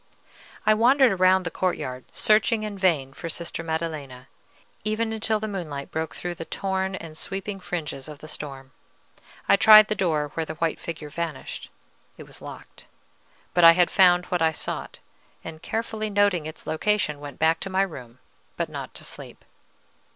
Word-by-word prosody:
I 215 - +6
wandered 250 +3 +5
around 185 0 +4
the 165 - -4
courtyard, 130 -9 -2
searching 215 +1 +3
in 210 -1 -4
vain 160 -9 +1
for 165 - -6
Sister 170 +1 -4
Maddelena, 155 -6 -4 0.5
even 220 +1 -1
until 220 0 0
the 215 - -3
moonlight 160 -9 -5
broke 160 0 -3
through 175 0 -4
the 165 - -7
torn 190 0 -2
and 165 -4 -8
sweeping 195 +3 -5
fringes 155 -7 -5
of 150 -1 -9
the 155 - -11
storm. 135 -3 -7 0.8
I - - +6
tried 215 +1 +9
the - - +2
door 160 -7 0
where 165 - -1
the 155 0 -6
white 165 0 -1
figure 155 -3 -6
vanished: 165 -2 -5 0.5
it - - -9
was - - -13
locked; - - -11 0.7
but 175 - +3
I 165 0 +11
had 175 0 +3
found 180 -2 +5
what 180 -2 -1
I 160 0 +4
sought, - - -4 0.5
and, 160 -1 -9
carefully 220 -1 -3
noting 200 -6 +2
its 155 - -10
location, 160 -3 0
went 145 -2 -9
back 160 +1 +3
to 195 - -5
my 190 +1 +2
room, 125 -10 -8 0.4
but - - -1
not - - -7
to - - -7
sleep. - - -8
175 Hz, 175 wpm, -25 LUFS, 155-200 Hz, 0.8 s, I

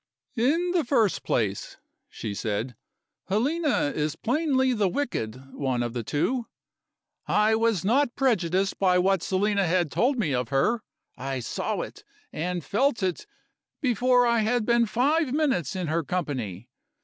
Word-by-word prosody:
"In 330 +9 +2
the 350 -3 +2
first 235 -6 +2
place," 100 -4 -2 0.3
she 105 - -5
said, 110 +4 -3 0.5
"Helena 265 - +1
is 150 0 -1
plainly 265 0 +1
the 210 -4 +1
wicked 135 - -4
one 130 -4 -1
of 120 -1 -4
the 120 - -2
two. 230 - -1 0.8
I 210 +1 +3
was 220 -5 +1
not 250 +3 +2
prejudiced 195 - +1
by 185 -2 +4
what 190 0 +2
Selina 200 +1 +1
had 175 -3 +1
told 260 +3 +1
me 170 - 0
of 125 -2 -1
her: 140 - +1 0.4
I 135 0 -3
saw 120 - -3
it, - - -8 0.3
and 175 +1 -3
felt 235 0 +1
it, 185 -2 -2 0.5
before 250 -1 +3
I 235 -1 +3
had 220 +1 +1
been 235 0 +3
five 275 +5 +1
minutes 265 - 0
in 185 -2 -2
her 165 +1 0
company. 130 - -3
200 Hz, 150 wpm, -26 LUFS, 150-245 Hz, 0.8 s, by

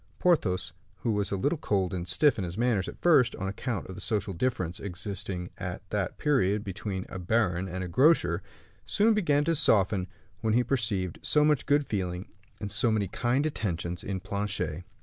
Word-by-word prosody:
Porthos, 110 - +1 0.3
who 115 - 0
was 105 -1 0
a - - -1
little 145 - 0
cold 95 - 0
and 90 -1 -3
stiff 120 - +3
in - - -1
his 90 0 -5
manners 115 -5 +1
at - - -8
first, 155 -8 +5
on 95 - -4
account 105 +1 -3
of 95 - -8
the 100 - -8
social 105 -2 -1
difference 90 -4 -1
existing 95 -1 -4
at 90 +1 -5
that 100 -3 -1
period 105 -9 +2
between 95 -1 -4
a 95 - -7
baron 90 -1 +1
and 95 +1 -4
a - - -4
grocer, 90 - +3 0.5
soon 220 +2 +3
began 150 -9 +2
to 165 - +1
soften 100 - +3 0.3
when 110 -1 +1
he 125 - +4
perceived 110 - -1
so 150 0 +3
much 150 -3 +2
good 145 0 +3
feeling 90 -4 -3 0.3
and 100 -1 -5
so 120 - +2
many 105 -3 +1
kind 120 - 0
attentions 90 - -2
in 95 -1 -3
Planchet. 100 -4 -3
100 Hz, 190 wpm, -28 LUFS, 90-125 Hz, 0.5 s, first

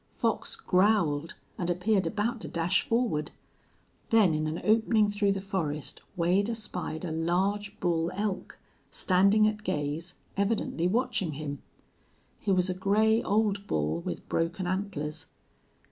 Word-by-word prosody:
Fox - - -1
growled, 180 -6 +2 0.2
and 175 -1 -1
appeared 185 +1 +1
about 220 +5 -1
to - - -5
dash 175 +4 +1
forward. 230 -11 +1 0.8
Then, 215 -7 +5
in 155 0 0
an 155 +2 -3
opening 220 -1 +3
through 205 -1 +2
the 195 - -3
forest, 155 -7 -3
Wade 185 +4 +2
espied 190 -7 -4
a 165 - -3
large 190 +6 -1
bull 170 -2 +1
elk, 200 -1 -3 0.3
standing 200 +3 +4
at 215 0 -2
gaze, 150 +2 -3 0.2
evidently 200 -4 0
watching 215 -6 0
him. 145 -1 -5 0.8
He 200 - -1
was 185 -1 +3
a 185 - 0
gray 215 +4 +3
old 205 -1 +1
bull, 75 +2 0
with - - -5
broken 170 +3 -1
antlers. 170 -5 -3
190 Hz, 135 wpm, -29 LUFS, 165-210 Hz, 0.8 s, Then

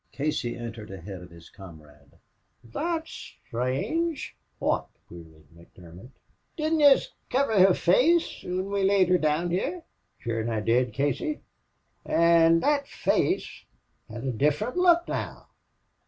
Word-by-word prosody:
Casey 140 -4 -2
entered 115 -2 -8
ahead 95 0 -8
of 90 - -12
his 85 -1 -16
comrade. 75 -6 -15 0.6
"Thot's 330 - -4
sthrange!" 140 - -2 0.2
"Wot?" - - -1 0.2
queried 80 -2 -14
McDermott. 85 +5 -15 0.5
"Didn't 315 0 0
yez 290 - +5 0.2
kiver 255 -6 +1
her 185 0 +6
face 315 - +2
whin 185 +2 -4
we 200 0 0
laid 190 -1 +3
her 180 0 +4
down 155 +3 0
here?" 330 - -2 0.3
"Shure 115 -2 -3
an' 115 - -3
I 110 -2 -1
did, 120 +2 +1
Casey." 145 - -2 0.6
"An' 165 0 +4
that 285 -1 +1
face - - -1 0.5
has - - -7
a 130 - 0
different 150 - 0
look 350 -1 +4
now!... - - -5
155 Hz, 130 wpm, -26 LUFS, -, 0.6 s, her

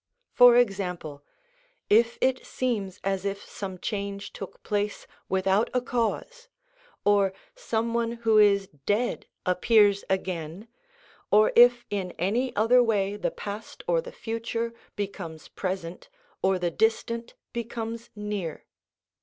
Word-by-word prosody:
For 245 -1 +8
example, 180 -10 0 0.6
if 230 +2 +4
it 260 0 +2
seems 205 -7 -2
as 195 -1 -1
if 200 0 -3
some 190 -2 -6
change 200 +1 -4
took 195 - -9
place 205 0 -2 0.2
without 190 +3 +2
a 250 - +3
cause, 250 - -2 0.6
or 200 -2 +4 0.2
some 230 - -2
one 235 0 0
who 225 -2 +3
is 200 -2 +5 0.2
dead 230 +4 0 0.2
appears 200 +2 +4
again, 185 +1 -3 0.6
or 215 +1 +5
if 240 0 +7
in 190 -3 -2
any 230 +9 0
other 230 +4 +5
way 205 -4 +1
the 210 - -1
past 205 +2 -7
or - - +2
the - - -9
future 230 0 -3 0.2
becomes 185 -6 -6
present 185 -2 -5 0.3
or 190 0 +3
the 175 -1 -1
distant 230 +3 0 0.2
becomes 230 -1 -5
near. 210 -6 -4
210 Hz, 125 wpm, -27 LUFS, 195-235 Hz, 0.6 s, For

